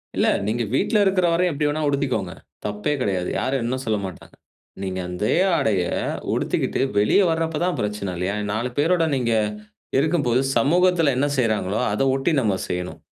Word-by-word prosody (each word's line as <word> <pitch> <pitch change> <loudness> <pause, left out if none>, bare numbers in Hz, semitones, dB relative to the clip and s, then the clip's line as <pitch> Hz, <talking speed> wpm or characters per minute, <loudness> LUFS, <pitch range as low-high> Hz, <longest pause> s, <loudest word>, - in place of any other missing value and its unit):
இல்ல. - - +2 0.2
நீங்க 115 +2 0
வீட்ல 215 - +2
இருக்குற 190 -2 +2
வரயும் 180 +1 +2
எப்டிவேணா 150 +1 -1
உடுத்திக்கோங்க. 130 -10 -1 0.3
தப்பே 105 +7 -1
கெடையாது, 95 -5 -1
யாரும் 130 -1 -1
என்ன 125 +2 -1
சொல்ல 110 -1 +1
மாட்டாங்க. 95 -2 -10 0.5
நீங்க 95 -1 -3
அந்தே 90 +4 0 0.2
ஆடைய 110 - +1 0.5
உடுத்திக்கிட்டு - - -1 0.2
வெளிய 105 - +4
வரப்ப 160 -1 -1
தான் 180 - -1
பிரச்சன 105 -2 -3
இல்லயா? 95 +4 -1 0.2
நாலு 115 +4 -1
பேரோட 165 +2 +3
நீங்க 120 -3 0 0.7
இருக்கும்போது, 140 -5 +2 0.2
சமூகத்துல 170 -1 +3
என்ன 140 +2 +2
செய்றாங்களோ, 110 -4 0
அத 105 - 0
ஒட்டி 135 +5 0
நம்ம 105 -5 +1
செய்யணும். 90 0 -4
125 Hz, 150 wpm, -22 LUFS, 105-155 Hz, 0.7 s, வெளிய